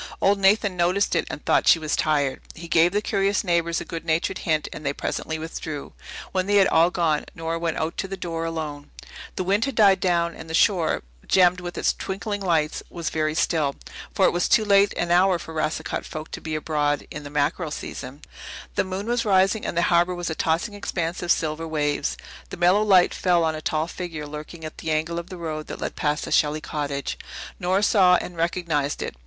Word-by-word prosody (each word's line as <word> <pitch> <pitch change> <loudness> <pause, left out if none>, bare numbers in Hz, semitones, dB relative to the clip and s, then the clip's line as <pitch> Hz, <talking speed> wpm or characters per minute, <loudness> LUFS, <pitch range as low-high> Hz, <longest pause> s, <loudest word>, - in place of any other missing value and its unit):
Old 200 +1 +3
Nathan 195 0 +3
noticed 180 +3 +1
it - - 0
and - - -7
thought - - +2
she - - +7
was 155 -2 -1
tired. 145 -3 0
He 170 +1 -9
gave 165 +1 +4
the 205 +1 0
curious 200 -1 +1
neighbours 170 -2 +1
a - - -6
good 165 - -6
natured 160 0 0
hint, 155 -3 0
and 155 - -8
they 140 -1 -1
presently 160 +2 -3
withdrew. 155 -2 -6 0.4
When 185 0 -1
they 205 - +2
had 200 -1 +6
all 165 +2 +4
gone 165 -4 0
Nora 165 0 -3
went 165 -2 -2
out 160 +1 -2
to 195 - -2
the 195 0 -6
door 165 -2 -4
alone. 155 -3 -5 0.5
The - - -1
wind 200 +6 +2
had 275 -3 -4
died 200 -3 +5
down 170 -2 +1
and 160 - -10
the 160 - -1
shore, 175 -4 +2 0.2
gemmed 180 -1 +4
with 175 -1 -7
its - - +2
twinkling 205 +1 -4
lights, 165 -5 0
was 170 -2 -4
very 155 -1 0
still, 155 -4 +1 0.4
for 195 - +2
it - - +4
was 175 0 0
too 215 - +4
late 200 0 +5
an 175 0 -1
hour 180 +1 +4
for 165 -1 -9
Racicot 155 0 -2
folk 155 0 -7
to - - -6
be 155 -1 -4
abroad 150 -1 0
in 150 - -6
the 145 - -8
mackerel 150 +3 0
season. 140 -1 -7 0.5
The - - +1
moon 190 +1 -4
was 240 +1 0
rising 195 0 +2
and 170 - -4
the 170 - +3
harbour 175 +1 +3
was 175 -2 -3
a - - 0
tossing 165 +7 0
expanse 175 -4 -3
of 175 0 0
silver 160 +1 0
waves. 145 - -1 0.3
The - - -7
mellow 180 +4 +4
light 190 -4 +5
fell 175 -2 +2
on 160 -1 +1
a 155 - -6
tall 155 0 0
figure 165 -3 -6
lurking 150 +2 -8
at 155 - -8
the 160 - -4
angle 160 +2 0
of 170 - -9
the 185 - -8
road 155 -2 -5
that - - -7
led - - -4
past 150 0 -1
the - - -7
Shelley 150 0 +2
cottage. 145 -3 -4 0.4
Nora 185 +3 +1
saw 185 -4 +5
and 180 0 -3
recognized 165 -4 -1
it. - - -5
170 Hz, 220 wpm, -24 LUFS, 155-185 Hz, 0.5 s, she